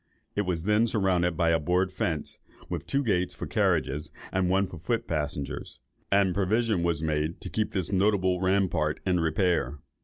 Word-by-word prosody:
It 105 -2 0
was 85 -3 -1
then 105 +4 +3
surrounded 90 -6 +1
with 85 0 +3
a 80 - +3
board 90 +4 +1
fence, 80 -4 -3 0.3
with - - -4
two 140 +1 +1
gates 90 -6 0
for - - -5
carriages, 75 +3 0 0.2
and 95 -1 +1
one 95 +1 +3
for 90 -3 -9
foot 115 +8 -1
passengers; 75 -3 -4 0.3
and 100 -2 +4
"provision 105 +1 +1
was 85 -2 0
made 80 +1 -1
to - - -6
keep 110 -1 -1
this 95 -3 -1
notable 95 -2 +2
rampart 95 -5 +1
in 90 -2 +2
repair." 80 -1 +1
90 Hz, 175 wpm, -28 LUFS, 80-100 Hz, 0.3 s, and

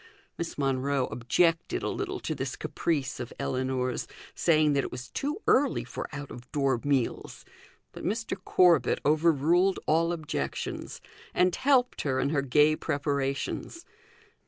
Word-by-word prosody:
Miss 170 - -5
Monro 135 -1 +1
objected 165 +9 +1
a - - 0
little - - -3
to - - -2
this - - -4
caprice 140 -6 -2
of 120 - -5
Ellinor's, 130 -1 -1 0.3
saying 155 -3 +3
that 140 -1 +2
it - - -5
was 125 -1 -8
too 295 +9 -3
early 275 +1 +3
for - - -6
out 145 -1 -7
of 120 0 -11
door 135 -5 +1
meals; 140 -4 -1 0.5
but - - -10
Mr. 220 +4 -2
Corbet 180 -3 +4
overruled 165 +4 +3
all 165 +2 +2
objections, 155 - -4 0.3
and 180 -1 +3
helped 260 -2 +2
her 130 -2 0
in 135 +2 0
her 145 -3 +2
gay 150 +3 +4
preparations. 140 - -2
145 Hz, 140 wpm, -28 LUFS, 135-170 Hz, 0.5 s, Corbet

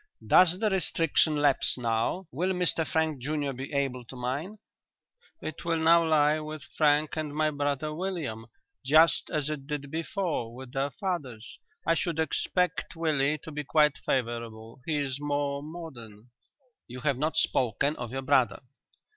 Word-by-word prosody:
"Does 180 0 +6
the 215 -1 +1
restriction 165 -4 +2
lapse 145 -3 +2
now; 115 +10 -1
will 180 +7 0
Mr 180 -3 +1
Frank 160 -4 0
junior 145 0 -2
be 130 +2 -7
able 135 -3 -1
to 130 - -11
mine?" 135 +12 -4 0.9
"It 155 - -6
will 165 -1 0
now 165 +1 +5
lie 155 -1 +3
with 155 -2 -7
Frank 150 0 +3
and 150 -2 -3
my 155 0 +2
brother 145 +1 -2
William, 155 - -4 0.4
just 155 +5 +4
as 150 -4 -1
it 140 -3 -6
did 145 -2 -4
before 160 -7 -2
with 130 0 -10
their 135 +1 0
fathers. 145 - -5 0.3
I 165 - +4
should 165 0 -1
expect 180 +2 0
Willie 155 -3 +1
to 160 - -7
be 150 0 -4
quite 150 0 +3
favourable. 115 -2 -3
He 155 -2 +1
is 140 -2 -2
more 145 -1 -1
modern." 125 -9 -10 0.6
"You 125 +1 -8
have 140 -4 0
not 155 +2 0
spoken 130 +5 +1
of 120 -1 -5
your 135 +1 -4
brother." 120 -6 +2
145 Hz, 155 wpm, -28 LUFS, 130-160 Hz, 0.9 s, Does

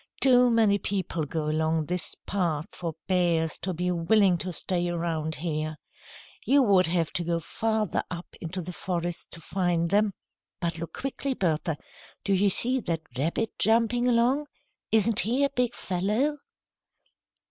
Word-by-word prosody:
"Too 250 -2 +6
many 220 -3 +4
people 185 -6 -2
go 155 +1 -3
along 160 +1 +1
this 180 +2 -2
path 165 -6 -1
for 170 -2 -5
bears 170 -4 +1
to 190 - -3
be 180 +1 -1
willing 180 +2 +3
to 185 +3 -3
stay 175 0 0
around 165 -2 -2
here. 155 0 -2 0.7
You 280 +1 +4
would 195 -6 +4
have 165 -1 0
to 175 -2 0
go 170 0 0
farther 220 +3 -1
up 175 -1 -5 0.2
into 180 +2 -4
the 180 +2 -6
forest 175 -1 -3
to 165 - -9
find 170 -1 0
them. 205 -1 +2 0.4
But 170 -1 -2
look 170 - -6
quickly, 270 0 -2
Bertha. 160 -4 0 0.5
Do 200 - +1
you 195 +1 +4
see 250 +7 +1
that 170 -7 -2
rabbit 165 - -2
jumping 230 +2 +3
along? 250 +5 +2 0.4
Isn't 220 0 +3
he 245 +6 +1
a 280 - +2
big 250 -3 0
fellow?" 210 +11 0
180 Hz, 155 wpm, -27 LUFS, 165-220 Hz, 0.7 s, Too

